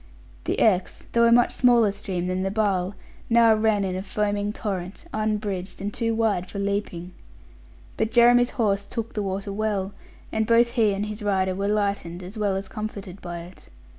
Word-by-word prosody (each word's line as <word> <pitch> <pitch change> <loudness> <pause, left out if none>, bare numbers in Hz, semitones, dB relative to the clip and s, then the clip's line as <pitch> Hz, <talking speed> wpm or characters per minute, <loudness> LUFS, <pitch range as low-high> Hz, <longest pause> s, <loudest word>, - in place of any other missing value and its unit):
The - - -1
Exe, 190 -4 +1
though 235 0 +4
a 230 - +5
much 240 +1 +5
smaller 240 -4 +4
stream 190 -3 -4
than 185 +1 -1
the 195 - 0
Barle, 200 -2 0 0.3
now 230 -1 +6
ran 215 -2 +2
in 185 -1 -2
a 185 - -2
foaming 205 0 -1
torrent, 195 - -5
unbridged, 210 -3 -2
and 205 +1 -4
too 230 -1 -1
wide 210 -5 0
for - - -7
leaping. 200 -3 -2 0.9
But 220 - +1
Jeremy's 245 +1 +5
horse 200 -4 +1
took 230 +2 -5
the 210 - -2
water 195 0 -3
well; 200 -2 -1 0.4
and 220 0 0
both 235 0 +4
he 220 -5 +2
and 200 +1 -2
his 210 +1 -6
rider 190 -2 +1
were 195 +2 -2
lightened, 200 -4 -1
as 185 +4 -9
well 205 -3 0
as 195 0 -4
comforted 200 -3 -7
by 175 -1 -6
it. 175 +2 -14
205 Hz, 185 wpm, -25 LUFS, 190-220 Hz, 0.9 s, now